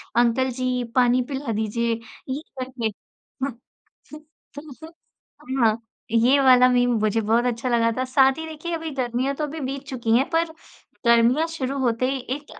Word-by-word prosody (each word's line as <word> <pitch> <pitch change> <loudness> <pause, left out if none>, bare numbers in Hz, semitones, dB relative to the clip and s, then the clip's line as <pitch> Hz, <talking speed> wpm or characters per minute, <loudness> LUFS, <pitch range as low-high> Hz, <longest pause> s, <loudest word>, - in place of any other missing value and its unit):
"Uncle 240 +2 +3
जी, 255 0 -1
पानी 250 0 +4
पिला 270 -3 -3
दीजिए।" 220 +2 -1 0.4
ये 270 +3 -3 0.2
करके। 255 -3 -3 0.6
हुँ, 275 - 0 1.1
तो 305 +2 -10 0.7
हाँ, 220 -1 +4 0.3
ये 240 +5 +4
वाला 255 -2 +6
मीम 245 0 +3
मुझे 215 +1 +1
बहुत 225 +3 +2
अच्छा 240 +1 -1
लगा 230 -1 +2
था। 255 - 0
साथ 265 +1 +3
ही 320 - -5
देखिए, 320 +2 -5
अभी 325 -1 -4
गर्मियाँ 255 +1 -1
तो 305 - -3
अभी 305 +2 -6
बीत 270 0 -4
चुकी 235 -4 +1
हैं, 265 +3 +2
पर 330 0 +2 0.6
गर्मियाँ 235 +7 +4
शुरू 275 -4 -3
होते 250 -1 +1
ही 270 - -2 0.2
एक 290 0 -14
255 Hz, 160 wpm, -23 LUFS, 235-275 Hz, 1.1 s, वाला